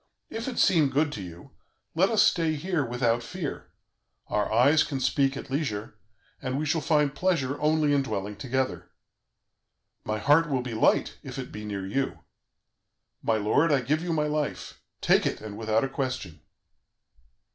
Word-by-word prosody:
If 225 +2 -4
it 255 - -4
seem 155 -6 +4
good 145 +3 +1
to 105 - -5
you, 85 -2 -10 0.4
let 185 +4 +3
us 220 -2 +4
stay 165 -6 +2
here 165 0 -1
without 120 -1 0
fear; 165 +3 -6 0.6
our 105 0 0
eyes 135 +8 +5
can 135 -3 -4
speak 135 +1 +1
at - - -8
leisure, 110 -8 -2 0.5
and 130 0 -2
we 155 - -1
shall 155 +2 +1
find 150 -3 +2
pleasure 145 -5 0
only 150 -1 +3
in 140 - +3
dwelling 105 -5 -4
together. 130 +2 -2 1.1
My 110 - -2
heart 150 +7 +4
will 130 -3 0
be 125 -2 -5
light 110 - +2
if - - -8
it - - -6
be 105 0 -7
near 100 -2 -4
you. 135 +8 -1 1.0
My 110 - +1
lord, 125 +10 +2
I 140 -3 +3
give 150 +6 0
you 175 0 -3
my 155 -2 +1
life. 150 -1 -3 0.2
Take - - +4
it, - - -3
and 105 -1 -8
without 110 +1 +1
a - - +1
question.' 130 - -4
135 Hz, 170 wpm, -27 LUFS, 115-155 Hz, 1.1 s, eyes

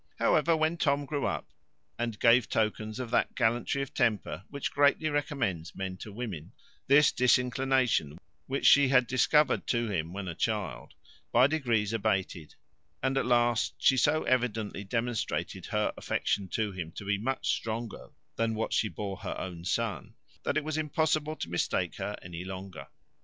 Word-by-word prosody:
However, 160 +1 +3
when 160 +2 +1
Tom 145 -3 +1
grew 145 0 -1
up, - - -4 0.5
and 115 -2 -2
gave 115 0 +5
tokens 110 +1 -1
of 125 -3 -5
that - - +1
gallantry 120 +4 +1
of 135 - -9
temper 100 -3 0
which 140 - -4
greatly 145 +2 +3
recommends 130 - -2
men 95 -1 -4
to 105 - -9
women, 100 -8 -6 0.3
this 140 +2 +6
disinclination 125 - +2 0.3
which 135 +1 -2
she 140 -1 +7
had 130 -1 +4
discovered 140 +5 +2
to 120 -3 0
him 80 -3 -2
when 100 0 -5
a 85 - -3
child, 95 - -3 0.4
by 120 +2 +6
degrees 120 -8 +1
abated, 95 -7 -1 0.5
and 130 0 +1
at 135 - 0
last 120 -2 +2
she 135 - +4
so 155 +4 +2
evidently 115 -5 -1
demonstrated 115 +2 -2
her - - 0
affection 100 -2 -1
to 105 +2 -1
him 90 -4 -6
to 100 - -8
be 100 0 0
much 130 +5 -1
stronger 115 0 -5 0.3
than 115 -1 0
what 110 - -2
she 110 - +2
bore 100 -3 -5
her 100 0 -5
own 90 -2 -6
son, 105 +1 -2 0.3
that - - -1
it 155 - 0
was 155 +1 -2
impossible 155 0 0
to 85 - -5
mistake 85 +1 -1
her 105 - -4
any 90 -1 -7
longer. 95 -2 -8
115 Hz, 165 wpm, -29 LUFS, 100-135 Hz, 0.5 s, she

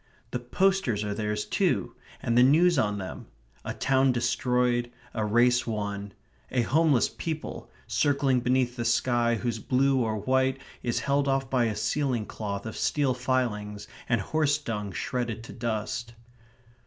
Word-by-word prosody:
The 125 - -2
posters 125 - +1
are 105 -1 -2
theirs 105 0 -2
too; - - 0 0.3
and 115 - +1
the 125 - +6
news 160 +5 +5
on 105 -4 +1
them. 95 -2 -7 0.4
A - - -4
town 135 -1 +3
destroyed; 125 0 +1 0.2
a 110 - -1
race 120 +4 +3
won. 100 -2 -3 0.4
A 125 -2 +1
homeless 145 0 +3
people, 160 -2 -5 0.2
circling 140 -3 +2
beneath 125 0 +1
the 120 - -3
sky 120 0 +2
whose 120 0 -2
blue 135 0 +2
or 110 -2 0
white 130 +5 +1 0.2
is 120 - -1
held 140 0 +1
off 135 -1 0
by 125 -3 +3
a 110 -2 -1
ceiling 130 -3 0
cloth 100 -2 -5
of 110 - -5
steel 140 -3 +1
filings 115 -5 -2 0.2
and 120 -2 +3
horse 150 +6 +1
dung 105 -8 -4
shredded 120 0 -3
to - - -10
dust. 115 0 -3
120 Hz, 155 wpm, -27 LUFS, 110-135 Hz, 0.4 s, the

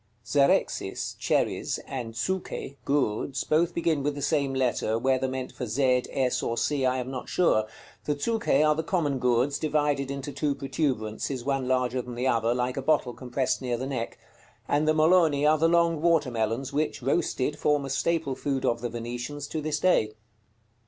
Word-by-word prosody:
Zerexis 140 +4 +1
(cherries) - - 0
and 120 -4 -5
Zuche 185 0 -3
(gourds) 135 -2 0
both 170 +3 +1
begin 165 -3 +1
with 145 +1 -1
the 145 - -5
same 140 -2 +1
letter, 120 -4 +1
whether 130 +2 +1
meant 130 0 -4
for 125 - -5
z, 125 +2 +2
s, 130 -2 0
or 115 - -2
c 135 +2 +1
I 130 0 +1
am 130 +1 -4
not 130 -2 -6
sure. 110 -12 +2 0.4
The 150 - 0
Zuche 155 -4 +1
are 150 - +4
the 155 - -1
common 155 -6 0
gourds, 125 +3 +1
divided 145 -3 0
into 140 +1 -4
two 145 -1 -1
protuberances, 130 -3 -2
one 135 -2 0
larger 125 -1 +1
than 125 0 -8
the 125 +2 -2
other, 115 -1 +2
like 125 +1 -1
a - - -1
bottle 135 -3 +1
compresed 125 +3 -2
near 125 -2 -1
the 130 - -4
neck; 125 -4 -4 0.5
and 150 +2 +1
the 155 - +3
Moloni 155 -2 +4
are 155 0 +4
the 165 - +4
long 170 -2 +3
water 160 -5 +3
melons, 115 +4 -2
which, 150 -3 -1
roasted, 145 0 0
form 150 -2 +2
a - - -5
staple 160 -1 0
food 135 0 -2
of 115 0 +1
the 120 - -2
Venetians 120 +5 -5
to 155 - -3
this 150 0 -1
day. 110 -13 +2
135 Hz, 185 wpm, -27 LUFS, 125-150 Hz, 0.5 s, are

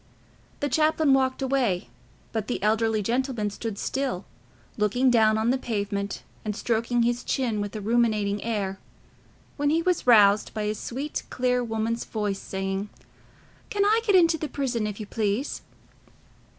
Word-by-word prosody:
The 290 - +1
chaplain 310 -1 +3
walked 265 0 +1
away, 250 - 0 0.4
but 220 -2 -3
the 245 - -3
elderly 220 0 +2
gentleman 240 -2 -1
stood 215 0 -5
still, 260 -8 -2 0.5
looking 245 +5 +2
down 220 -2 +4
on 220 +2 +2
the 260 - 0
pavement 200 -4 -3 0.2
and 210 -1 -3
stroking 235 +1 0
his 240 +1 0
chin 235 -6 -1
with 205 +1 -5
a 215 - -4
ruminating 215 -2 +1
air, 200 -4 -2 0.8
when 290 0 +1
he 325 +2 +2
was 360 -7 0
roused 210 -3 +5
by 215 - -1
a 210 0 0
sweet 265 +7 -4
clear 250 -1 +1
woman's 225 0 -2
voice, 205 -3 -2
saying, 195 +1 -3 0.8
"Can 405 -1 +1
I 440 +2 +4
get 410 -4 +3
into 330 -3 +5
the 310 - -3
prison, 245 -6 -1
if 210 0 -6
you 215 - -5
please?" 215 +5 -2
230 Hz, 155 wpm, -26 LUFS, 210-265 Hz, 0.8 s, roused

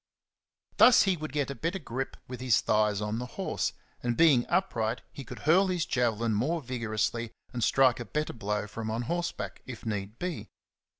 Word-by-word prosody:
Thus 250 - +8
he 195 -2 +2
would 155 -3 -6
get 145 -1 -1
a - - -3
better 165 +7 -2
grip 135 -5 -5
with 125 -1 -7
his 125 -5 +4
thighs 105 -1 +2
on 105 +2 -2
the 125 - -4
horse, - - -1 0.3
and, 120 -1 -1
being 145 -8 +5
upright, 120 -11 0
he 140 - -7
could - - -9
hurl 185 +6 +5
his 180 -3 0
javelin 115 -2 +1
more 140 +11 +1
vigorously 115 -3 -2 0.2
and 120 -2 -2
strike 130 +1 +4
a 120 - -5
better 150 +4 -2
blow 105 -2 -2
from 110 +1 -5
on 115 +2 -2
horseback, 175 +7 -3
if 125 -3 -8
need 105 0 -3
be. 180 -3 -4
125 Hz, 185 wpm, -29 LUFS, 110-155 Hz, 0.3 s, Thus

